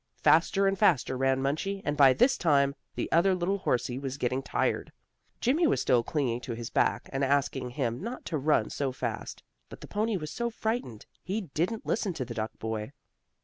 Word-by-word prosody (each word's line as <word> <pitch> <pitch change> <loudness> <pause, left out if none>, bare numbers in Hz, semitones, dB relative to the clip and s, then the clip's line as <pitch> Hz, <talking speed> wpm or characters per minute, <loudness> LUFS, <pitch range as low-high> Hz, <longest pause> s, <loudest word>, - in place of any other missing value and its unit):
Faster 195 -1 +4
and 195 -1 +1
faster 165 - +3
ran 135 0 +1
Munchie, 195 +8 -2
and 145 - 0
by 140 -3 +7
this 250 - +4
time 140 -4 +3 0.2
the - - -2
other 185 +3 +4
little 185 +3 -1
horsie 125 -5 -1
was 135 -1 -4
getting 130 0 -1
tired. - - -1 0.5
Jimmie 305 +8 +3
was - - +2
still 125 -2 +3
clinging 125 -2 -1
to 120 - -5
his 115 +1 -6
back, - - +1
and 135 +1 0
asking 135 -2 +1
him 120 -2 -2
not 235 +5 -6
to 155 - -2
run 135 -6 +2
so 140 -2 -1
fast, 125 - -5 0.3
but - - -11
the - - -9
pony 215 0 0
was 155 -3 -6
so 235 +8 -2
frightened 220 - -3 0.2
he 205 +4 -2
didn't 185 +8 -1
listen 205 -4 0
to 135 -6 -4
the 120 - -6
duck 110 -1 -4
boy. 110 +3 -4
145 Hz, 195 wpm, -29 LUFS, 130-195 Hz, 0.5 s, by